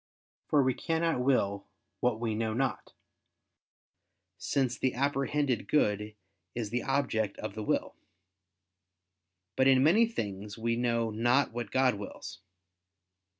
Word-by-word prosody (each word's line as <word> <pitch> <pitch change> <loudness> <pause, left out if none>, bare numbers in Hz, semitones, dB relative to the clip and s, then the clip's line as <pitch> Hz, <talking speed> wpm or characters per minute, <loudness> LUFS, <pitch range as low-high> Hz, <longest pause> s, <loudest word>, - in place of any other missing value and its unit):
For 145 -2 +4
we 130 0 +2
cannot 165 0 0
will 100 -7 +1 0.3
what 120 -3 +1
we 115 -2 -1
know 110 0 -1
not: 135 +1 -2 1.5
since 130 -3 0
the 130 +1 -1
apprehended 140 0 0
good 105 -6 +1 0.4
is 110 -3 -3
the 120 +1 0
object 125 -7 -1
of 110 -2 -5
the 110 - -5
will. 105 - -1 1.6
But 130 0 +3
in 130 -1 +5
many 210 +10 +5
things 105 - -5
we 115 +1 0
know 115 -2 0
not 120 +5 +2
what 120 -2 -5
God 130 -1 +3
wills. 100 -4 -8
120 Hz, 125 wpm, -30 LUFS, 110-135 Hz, 1.6 s, in